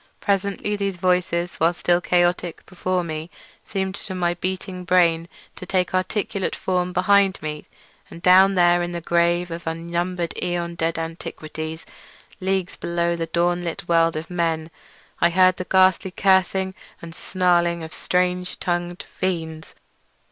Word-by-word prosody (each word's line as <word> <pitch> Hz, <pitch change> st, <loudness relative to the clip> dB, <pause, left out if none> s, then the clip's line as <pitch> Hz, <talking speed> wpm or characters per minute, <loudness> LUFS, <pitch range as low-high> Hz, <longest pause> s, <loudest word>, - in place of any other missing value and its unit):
Presently 200 Hz, +1 st, 0 dB
those 200 Hz, -2 st, -2 dB
voices, 180 Hz, -1 st, 0 dB
while 165 Hz, +2 st, +2 dB
still 175 Hz, 0 st, +2 dB
chaotic 175 Hz, -1 st, +1 dB
before 185 Hz, 0 st, -2 dB
me, 160 Hz, 0 st, -5 dB, 0.3 s
seemed 190 Hz, -1 st, -2 dB
to 190 Hz, -1 st, -6 dB
my 175 Hz, -1 st, +1 dB
beating 185 Hz, +1 st, -4 dB
brain 175 Hz, -2 st, +3 dB, 0.3 s
to 185 Hz, -, -9 dB
take 185 Hz, -1 st, 0 dB
articulate 190 Hz, +1 st, -1 dB
form 180 Hz, -1 st, -1 dB
behind 195 Hz, +1 st, +3 dB
me; 150 Hz, -1 st, -5 dB, 0.4 s
and -, -, -10 dB
down 190 Hz, +2 st, +6 dB
there 175 Hz, -1 st, +4 dB
in 175 Hz, 0 st, -3 dB
the 170 Hz, -, -2 dB
grave 170 Hz, +1 st, +1 dB
of 165 Hz, 0 st, -6 dB
unnumbered 170 Hz, +1 st, -2 dB
aeon 175 Hz, -1 st, -2 dB
dead 165 Hz, 0 st, -1 dB
antiquities, 160 Hz, -1 st, -6 dB, 0.5 s
leagues 190 Hz, -1 st, -1 dB
below 170 Hz, 0 st, 0 dB
the 165 Hz, -1 st, -3 dB
dawn 175 Hz, +1 st, +1 dB
lit 170 Hz, 0 st, -5 dB
world 165 Hz, -1 st, +3 dB
of 155 Hz, +3 st, -5 dB
men, 165 Hz, -2 st, -1 dB, 0.5 s
I 170 Hz, -, +4 dB
heard 185 Hz, +1 st, +4 dB
the 185 Hz, -, -4 dB
ghastly 190 Hz, 0 st, +4 dB
cursing 190 Hz, 0 st, +2 dB, 0.3 s
and 165 Hz, -1 st, -9 dB
snarling 175 Hz, -2 st, +1 dB
of 160 Hz, +2 st, -8 dB
strange 180 Hz, 0 st, -1 dB
tongued 175 Hz, 0 st, -2 dB
fiends. 160 Hz, -4 st, -4 dB
175 Hz, 145 wpm, -23 LUFS, 170-185 Hz, 0.5 s, down